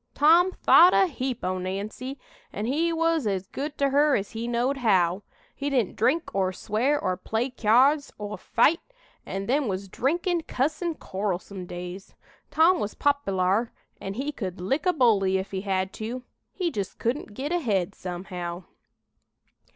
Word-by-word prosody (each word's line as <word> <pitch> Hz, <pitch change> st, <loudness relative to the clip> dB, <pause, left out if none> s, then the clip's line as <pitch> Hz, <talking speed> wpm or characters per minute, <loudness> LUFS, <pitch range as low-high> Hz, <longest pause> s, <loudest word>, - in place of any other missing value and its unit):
Tom 335 Hz, +5 st, +5 dB
thought 360 Hz, +2 st, +7 dB
a 385 Hz, -, +5 dB
heap 260 Hz, -7 st, -4 dB
o' 185 Hz, 0 st, -1 dB
Nancy, 205 Hz, +8 st, -5 dB, 0.3 s
an' 210 Hz, -, -4 dB
he 315 Hz, +7 st, +1 dB
was 330 Hz, -5 st, +1 dB
as 195 Hz, -2 st, -1 dB
good 285 Hz, +8 st, -5 dB
to 280 Hz, -1 st, +1 dB
her 290 Hz, +1 st, +4 dB
as 200 Hz, -1 st, -2 dB
he 230 Hz, +1 st, -4 dB
knowed 240 Hz, +3 st, 0 dB
how. 190 Hz, -6 st, +2 dB, 0.3 s
He 285 Hz, 0 st, -2 dB
didn't 250 Hz, -8 st, 0 dB
drink 315 Hz, +9 st, +1 dB
or 190 Hz, -1 st, +1 dB
swear 230 Hz, +9 st, 0 dB
or 185 Hz, -11 st, -1 dB
play 230 Hz, +7 st, -2 dB
cyards 260 Hz, +7 st, +3 dB
or 210 Hz, 0 st, -5 dB
fight, 290 Hz, +12 st, +2 dB, 0.5 s
an' 195 Hz, 0 st, -4 dB
them 275 Hz, +3 st, +1 dB
was 195 Hz, 0 st, -3 dB
drinkin', 340 Hz, -, 0 dB
cussin', 310 Hz, +5 st, -1 dB
quarrelsome 190 Hz, -3 st, -4 dB
days. 180 Hz, +2 st, -8 dB, 0.3 s
Tom 340 Hz, +3 st, +4 dB
was 210 Hz, -, -3 dB
popylar, 215 Hz, -6 st, +1 dB, 0.3 s
an' 195 Hz, 0 st, -5 dB
he 275 Hz, +5 st, -2 dB
could 190 Hz, -9 st, -5 dB
lick 270 Hz, -, -1 dB
a 360 Hz, -, +4 dB
bully 205 Hz, -, +3 dB
if 190 Hz, +1 st, -5 dB
he 190 Hz, -1 st, -3 dB
had 190 Hz, -1 st, -1 dB
to. 240 Hz, +3 st, -5 dB, 0.3 s
He 355 Hz, -3 st, -2 dB
jist 200 Hz, -6 st, -4 dB
couldn't 235 Hz, -3 st, -3 dB
git 280 Hz, +6 st, -4 dB
ahead, 205 Hz, -, 0 dB
somehow." 180 Hz, -1 st, -6 dB
230 Hz, 160 wpm, -26 LUFS, 195-285 Hz, 0.5 s, thought